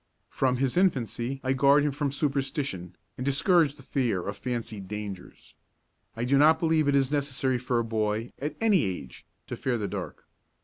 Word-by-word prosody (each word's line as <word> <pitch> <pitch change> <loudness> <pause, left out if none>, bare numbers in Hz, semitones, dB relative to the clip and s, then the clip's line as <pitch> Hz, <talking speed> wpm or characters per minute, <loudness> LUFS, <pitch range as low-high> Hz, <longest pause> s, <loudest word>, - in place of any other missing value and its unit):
From 130 -1 +1
his 135 +3 0
infancy 135 - 0
I 130 0 +1
guard 140 +2 +5
him 145 - +1
from 140 0 -2
superstition 135 - -2 0.2
and - - -2
discourage 145 +2 +3
the - - -15
fear 120 -10 -1
of 100 - -3
fancied 115 -6 -5
dangers. 100 -3 -8 0.6
I 115 - -2
do 135 +2 +3
not 160 +2 +6
believe 160 -2 +2
it 140 - +3
is 135 -1 +2
necessary 135 -3 0
for 125 0 -1
a 115 - +2
boy, 110 0 -1
at 150 +3 -3
any 215 -6 +3
age, 90 - -6 0.2
to - - -5
fear 125 -2 -1
the 105 -2 -2
dark. - - -6
130 Hz, 180 wpm, -27 LUFS, 115-145 Hz, 0.6 s, not